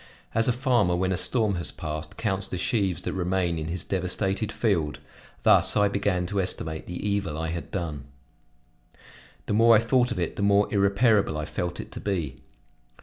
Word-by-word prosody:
As 115 0 +2
a - - +4
farmer, 120 -8 +2
when 95 +1 0
the - - +1
storm 105 0 +1
has 85 - -1
passed, 75 0 -6
counts 95 -3 -1
the 90 - -4
sheaves 95 -5 0
that - - -3
remain 90 -2 -1
in 75 - -4
his 85 +1 -3
devastated 95 +3 -1
field, 80 - 0 0.5
thus - - +5
I 105 -1 +4
began 100 -3 0
to 100 +2 -1
estimate 80 -3 -2
the 90 +4 -4
evil 100 -7 -1
I 80 0 -2
had 85 +1 -5
done. 80 -7 -4 1.4
The - - -2
more 115 +2 +6
I - - +6
thought 125 +2 +2
of - - -4
it, 85 -2 -2
the - - -3
more 100 0 +4
irreparable 100 -3 +3
I 75 - -3
felt 85 +1 -4
it - - -7
to - - -7
be. 85 -10 -3
95 Hz, 190 wpm, -26 LUFS, 85-105 Hz, 1.4 s, more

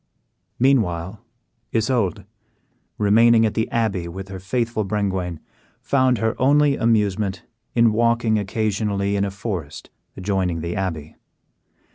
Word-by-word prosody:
Meanwhile 105 -6 +1 0.5
Isoude, 110 -4 0 0.7
remaining 115 +2 +5
at 110 - 0
the 110 - -1
abbey 105 -7 -1
with 95 +3 -8
her 95 -1 -7
faithful 115 +3 -1
Brengwain, 95 -5 -2 0.4
found 130 -2 +2
her 110 +1 0
only 145 +1 +4
amusement 105 -5 0 0.3
in 115 -2 +4
walking 115 -1 +2
occasionally 100 -1 -1
in 100 0 +1
a - - -2
forest 95 -6 -6 0.3
adjoining 95 -3 -1
the 85 +2 -4
abbey. 80 -6 -4
105 Hz, 115 wpm, -22 LUFS, 95-115 Hz, 0.7 s, remaining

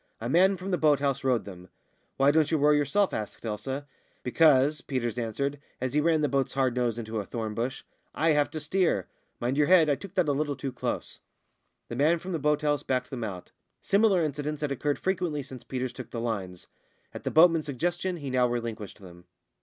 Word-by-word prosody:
A 115 - -4
man 185 +8 +4
from 185 +2 -5
the 180 - +1
boat 150 -3 +4
house 140 -1 -1
rowed 125 -3 +1
them. 90 -2 -11 0.5
"Why 135 +1 +5
don't 155 0 +3
you 160 - +2
row 150 +1 +4
yourself?" 150 +7 +2
asked 110 +2 -5
Elsa. 130 +6 -4 0.4
"Because," 145 +1 +4
Peters 125 -3 -2
answered, 140 +5 -2 0.2
as 130 0 -2
he 150 - +3
ran 160 0 +2
the 150 - +2
boat's 135 0 0
nose 130 -2 +1
hard - - -6 0.2
into 110 -1 -4
a - - -2
thorn 110 -3 -4
bush, 120 +4 -3 0.3
"I 160 +1 +3
have 150 -1 +2
to 155 - -5
steer. 155 - +1 0.3
Mind 125 +3 -1
your 150 -1 +3
head 165 -4 +6
I - - +3
took 195 +5 -11
that 180 -4 +2
a - - +3
little 145 0 -1
too 135 -1 -4
close." 125 - -4 0.7
The 120 - -6
man 155 +6 +3
from 180 +3 -7
the 165 - -1
boat 150 +1 +1
house 145 -1 +1
backed 125 -2 -2
them 125 -3 -4
out. 95 -5 -6 0.3
Similar 200 -3 +3
incidents 150 0 -3
had 150 -2 -1
occurred 145 +2 -1
frequently 175 -6 -1
since 130 -2 -10
Peters 130 -1 -4
took 130 - -8
the 115 - -5
lines. 100 -6 -4 0.5
At - - -8
the - - -1
boatman's 165 -1 +5
suggestion 175 +6 -2
he 140 -4 -5
now 125 -1 +3
relinquished 115 -4 -5
them. 85 -2 -13
140 Hz, 215 wpm, -28 LUFS, 120-155 Hz, 0.7 s, head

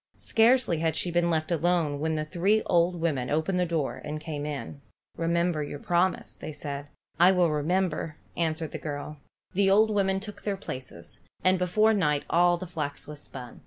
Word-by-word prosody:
Scarcely 225 -6 +3
had 160 -1 0
she 175 - 0
been 170 0 +2
left 160 0 0
alone 165 -3 +1
when 160 +1 0
the 155 0 -2
three 190 +6 +1
old 175 0 +2
women 145 -7 -1
opened 160 +5 0
the 180 - +1
door 160 -5 -2
and 150 +1 -4
came 150 -2 -5
in. 145 -1 -6 0.3
"Remember 170 -1 +1
your 145 0 -5
promise," 175 +4 0
said 145 -1 -6 0.3
they. 175 - +7
"I 185 - +7
will 180 -3 +3
remember," 155 0 -1 0.2
answered 160 -2 -1
the - - -5
girl. 145 0 -6 0.3
The 195 +1 +3
old 215 +3 +5
women 195 -2 +1
took 210 +1 -8
their 200 -2 -2
places, 130 - -8 0.2
and 185 0 +4
before 215 +5 +3
night 150 -8 +1
all 175 +1 +4
the 185 - -6
flax 150 -5 -4
was 150 -1 -8
spun. 125 -4 -9
170 Hz, 185 wpm, -27 LUFS, 150-185 Hz, 0.3 s, they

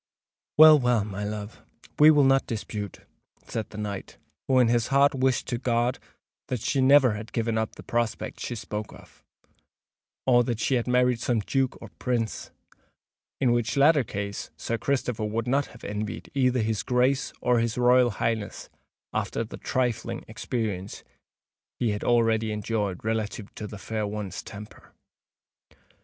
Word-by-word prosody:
"Well—well, 130 -8 +7
my 105 0 -5
love, 105 +1 -6 0.4
we 150 +1 +9
will 150 -2 +6
not 135 0 +3
dispute," 105 -3 -5 0.4
said 110 -3 -4
the 105 - -10
knight, 105 -2 -5 0.3
who 130 - +3
in 125 -2 +5
his 120 -1 +2
heart 140 +1 +4
wished 130 -1 +1
to 120 -2 -2
God 120 0 0 0.5
that 125 - -2
she 135 +5 0
never 135 -1 +6
had 105 +2 -7
given 115 -1 -1
up 110 -1 -2
the - - -11
prospects 120 -2 -2
she 120 - -4
spoke 105 -1 -5
of; - - -17 1.0
or 120 -2 +5
that 120 -2 -2
she 135 - 0
had 120 -1 +1
married 125 -1 +3
some 120 -1 0
Duke 135 +4 -1
or - - -10
Prince—in 120 +2 -4
which 120 +1 0
latter 145 0 +5
case 100 -2 -5
Sir 115 0 -3
Christopher 125 -5 -1
would 110 +2 -2
not 140 +3 +1
have 115 - -16
envied 105 +1 -5
either 125 -3 +2
his 110 -1 -1
Grace 130 +2 +1
or 125 -1 +2
his 115 0 -1
Royal 125 0 +5
Highness, 110 0 -3 0.4
after - - -1
the - - -9
trifling 120 -2 -2
experience 110 -4 -4 0.7
he 120 -3 0
had 105 - -3
already 115 -2 +2
enjoyed 105 -2 -2
relative 110 -1 -3
to 105 - -6
the 105 - -8
fair 110 +2 -3
one's 100 -3 -5
temper. 105 +1 -12
115 Hz, 155 wpm, -26 LUFS, 105-125 Hz, 1.0 s, we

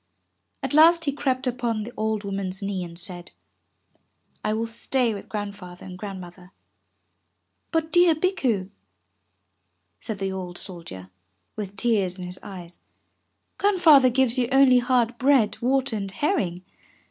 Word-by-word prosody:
At - - -3
last 330 +2 +6
he 280 - +1
crept 270 -2 -1
upon 240 -3 -1
the 240 +3 -9
old 215 -1 -1
woman's 195 -1 -4
knee 195 -2 -2
and 170 -1 -9
said, 175 -1 -3 1.1
"I - - 0
will 220 +1 -1
stay 235 +1 0
with 200 - -9
Grandfather 200 -4 -7
and 185 -1 -8
Grand 195 0 -7
mother." 180 +1 -13 1.2
"But, 325 -1 -1
dear 350 -2 +5
Bikku," 255 - 0 1.3
said 220 - -5
the 195 0 -2
old 180 -2 -6
soldier, 165 - -5 0.4
with 200 -1 -6
tears 200 -6 +1
in 180 - -6
his 180 +1 -8
eyes, 175 -3 -10 0.8
"Grandfather 330 -10 +6
gives 255 0 +2
you 245 - +1
only 265 -2 +6
hard 245 -1 +1
bread, 260 -5 +3
water 260 -1 +1
and 195 -1 -4
herring. 190 - -1
215 Hz, 140 wpm, -24 LUFS, 185-260 Hz, 1.3 s, last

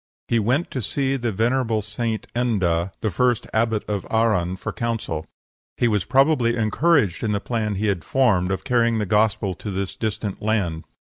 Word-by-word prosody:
He 115 - +2
went 125 +10 0
to 130 - -3
see 135 +5 0
the 120 -3 -1
venerable 115 +1 +1
St. 110 +1 -3
Enda, 95 -8 +1
the 110 - 0
first 120 +5 +1
abbot 110 -1 0
of 100 -2 -2
Arran, 105 -6 +1
for - - -5
counsel. 115 -9 -3 0.5
He 120 - +2
was 105 -5 +1
probably 130 -1 +3
encouraged 115 - +2
in 105 -2 0
the 100 - 0
plan 110 -1 -2
he 100 +3 -1
had 95 -6 0
formed 105 -9 +2
of 95 - -2
carrying 120 -3 +2
the 105 - 0
Gospel 105 -1 +1
to 105 - -7
this 95 -1 -3
distant 105 -2 -3
land. 100 -7 -1
110 Hz, 180 wpm, -23 LUFS, 100-120 Hz, 0.5 s, probably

